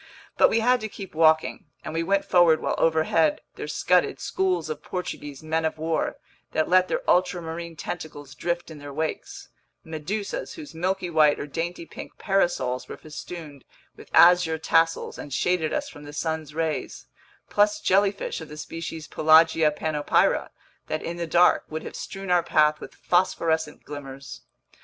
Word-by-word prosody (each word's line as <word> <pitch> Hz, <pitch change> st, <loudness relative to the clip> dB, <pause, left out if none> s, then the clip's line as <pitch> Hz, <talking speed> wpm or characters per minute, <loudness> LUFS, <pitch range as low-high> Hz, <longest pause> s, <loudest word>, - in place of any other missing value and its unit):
But -, -, +5 dB
we 225 Hz, -, +2 dB
had 250 Hz, +2 st, +3 dB
to 220 Hz, -, -4 dB
keep 195 Hz, -2 st, -9 dB
walking, 160 Hz, 0 st, +3 dB, 0.2 s
and 155 Hz, -, -5 dB
we 165 Hz, -, 0 dB
went 195 Hz, +4 st, +1 dB
forward 175 Hz, -3 st, +5 dB
while -, -, -1 dB
overhead 160 Hz, -1 st, +2 dB
there -, -, -7 dB
scudded 180 Hz, +4 st, +1 dB
schools 185 Hz, -4 st, -1 dB
of 155 Hz, -1 st, -5 dB
Portuguese 150 Hz, -6 st, -6 dB
men 160 Hz, +1 st, -1 dB
of 160 Hz, 0 st, -1 dB
war 160 Hz, +1 st, -1 dB, 0.4 s
that 155 Hz, -, +1 dB
let 185 Hz, 0 st, +4 dB
their -, -, -3 dB
ultramarine 170 Hz, -2 st, 0 dB
tentacles 150 Hz, -4 st, -7 dB
drift 170 Hz, +4 st, -3 dB
in 155 Hz, -, -10 dB
their 145 Hz, 0 st, -8 dB
wakes, 395 Hz, -, -4 dB, 0.3 s
medusas 170 Hz, +5 st, -4 dB
whose 310 Hz, -3 st, -10 dB
milky 180 Hz, +2 st, -2 dB
white 155 Hz, -2 st, +4 dB
or -, -, -3 dB
dainty 170 Hz, +3 st, -4 dB
pink -, -, -10 dB
parasols 175 Hz, -10 st, 0 dB
were -, -, -8 dB
festooned 150 Hz, -2 st, -9 dB, 0.3 s
with -, -, -14 dB
azure 175 Hz, -2 st, +6 dB
tassels 165 Hz, +1 st, +1 dB
and 140 Hz, -3 st, -5 dB
shaded 175 Hz, -1 st, +1 dB
us 290 Hz, -1 st, -2 dB
from 210 Hz, -, -12 dB
the 145 Hz, 0 st, -10 dB
sun's 160 Hz, -1 st, -3 dB
rays, 160 Hz, -1 st, -3 dB, 0.5 s
plus 205 Hz, 0 st, +3 dB
jellyfish 195 Hz, -2 st, +1 dB
of 160 Hz, -, -9 dB
the 150 Hz, -, -9 dB
species 160 Hz, 0 st, -6 dB
Pelagia 160 Hz, 0 st, +5 dB
panopyra 150 Hz, 0 st, +1 dB, 0.4 s
that, 155 Hz, -, -3 dB
in 170 Hz, +1 st, -4 dB
the 170 Hz, -1 st, -3 dB
dark, 175 Hz, +2 st, +4 dB
would 155 Hz, 0 st, -5 dB
have -, -, -8 dB
strewn 195 Hz, -1 st, -6 dB
our 175 Hz, -1 st, +5 dB
path 150 Hz, -2 st, +3 dB
with -, -, -10 dB
phosphorescent 160 Hz, -3 st, 0 dB
glimmers! 140 Hz, -2 st, -9 dB
160 Hz, 165 wpm, -25 LUFS, 155-180 Hz, 0.5 s, azure